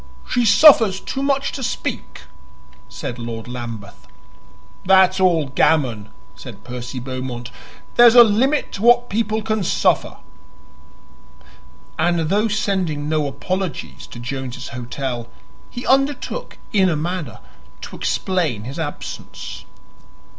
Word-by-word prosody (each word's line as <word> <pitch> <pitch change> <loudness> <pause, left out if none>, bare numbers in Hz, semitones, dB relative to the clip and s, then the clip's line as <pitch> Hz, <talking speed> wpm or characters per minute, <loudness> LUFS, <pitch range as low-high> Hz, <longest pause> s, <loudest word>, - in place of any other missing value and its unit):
"She 245 - +1
suffers 215 -3 +6
too 270 - -5
much 275 0 0
to 270 - -6
speak," 250 - -4 0.7
said 120 - -6
Lord 115 -1 -6
Lambeth. 115 -4 -8 0.8
"That's 190 0 +4
all 170 -6 +2
gammon," 130 -8 +1 0.3
said - - -11
Percy 125 +1 -7
Beaumont; 125 -1 -6 0.5
"there's 240 -1 +8
a 240 - +11
limit 250 +7 +1
to 195 - -7
what 240 +1 +4
people 220 0 -1
can 215 -2 -1
suffer!" - - +1 1.8
And, 170 -2 +1
though 210 +4 +2
sending 190 -8 -1
no 155 -2 0
apologies 180 +6 -4
to - - -11
Jones's 125 0 -6
Hotel, 125 0 -5 0.4
he 245 - -7
undertook 275 - 0 0.2
in 190 -3 +4
a 165 - 0
manner 160 -4 -4 0.4
to - - -8
explain 165 - -1
his 135 +7 -7
absence. 145 -2 -7
170 Hz, 120 wpm, -20 LUFS, -, 1.8 s, a